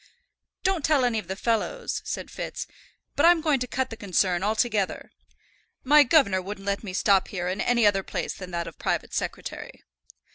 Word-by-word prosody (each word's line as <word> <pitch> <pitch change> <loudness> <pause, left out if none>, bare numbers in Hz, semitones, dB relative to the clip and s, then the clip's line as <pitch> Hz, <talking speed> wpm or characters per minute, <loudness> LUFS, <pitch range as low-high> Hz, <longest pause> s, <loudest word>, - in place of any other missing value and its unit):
"Don't 375 -5 +1
tell 285 -4 +3
any 230 -3 +1
of 210 - -9
the 190 - -3
fellows," 235 - -1
said - - -5
Fitz, - - -5 0.5
"but 285 - +1
I'm 345 0 +6
going 305 -4 +1
to 250 - -3
cut 260 +1 -2
the - - -5
concern 185 -4 0
altogether. 215 -1 -1 0.7
My 295 +3 +7
governor 250 - +4
wouldn't 195 +1 -7
let 200 +1 -1
me 200 - -5
stop 195 +1 +3
here 180 -3 -4
in 185 +2 -2
any 235 -2 +2
other 200 -2 +4
place - - -4
than 185 -2 -9
that 170 -1 -3
of 165 - -10
private - - -2
secretary." - - -5
215 Hz, 185 wpm, -26 LUFS, 190-265 Hz, 0.7 s, My